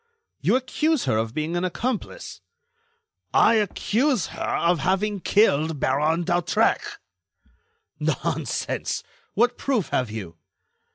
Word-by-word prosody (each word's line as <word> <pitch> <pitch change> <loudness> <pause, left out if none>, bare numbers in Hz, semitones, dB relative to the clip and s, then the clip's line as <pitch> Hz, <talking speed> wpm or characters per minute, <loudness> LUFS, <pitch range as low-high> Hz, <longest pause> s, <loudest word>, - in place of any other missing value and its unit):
"You - - +2
accuse 295 +3 0
her 110 - +1
of 110 +1 -2
being 155 +2 -2
an 175 - -1
accomplice?" 240 - -4 0.9
"I - - +6
accuse 225 - +1
her - - -8 0.2
of 170 0 +2
having 195 +6 0
killed 160 -7 +2
Baron 150 +6 +1
d'Hautrec." 175 +6 +2 1.2
"Nonsense! - - -2 0.3
What 240 +1 +2
proof 240 - 0
have 125 -3 0
you?" 95 -7 -7
180 Hz, 110 wpm, -24 LUFS, 150-230 Hz, 1.2 s, I